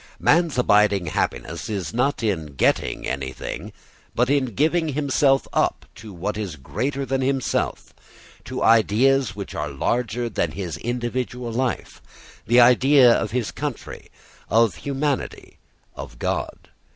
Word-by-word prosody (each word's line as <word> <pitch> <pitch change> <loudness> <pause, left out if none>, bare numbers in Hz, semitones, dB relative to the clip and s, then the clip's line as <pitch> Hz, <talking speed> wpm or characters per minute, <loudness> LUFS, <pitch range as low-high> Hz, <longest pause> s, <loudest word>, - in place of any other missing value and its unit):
Man's 165 -2 +3
abiding 105 -5 +3
happiness 70 - -3
is 100 -4 -4
not 125 +2 0
in 80 -10 -2
getting - - 0
anything 65 -1 -5 0.4
but 125 +3 +2
in 140 -2 +2
giving 160 +3 +2
himself 140 -1 +2
up - - 0
to 110 0 -11
what 95 +4 -4
is 95 -7 -4
greater 125 - -3
than 135 0 -1
himself, 135 0 -1 0.5
to - - -4
ideas 115 +2 +3
which 100 -1 -7
are 75 -1 -3
larger 120 - -1
than 85 -8 -2
his 90 -3 -5
individual 120 0 -3
life, 130 +2 -3 0.5
the 120 +3 +5
idea 125 +1 +6
of 110 - -1
his 120 0 -2
country, - - -6 0.4
of 115 -3 +3
humanity, 140 0 -3 0.4
of 65 -3 -9
God. - - -4
120 Hz, 130 wpm, -23 LUFS, 100-135 Hz, 0.5 s, idea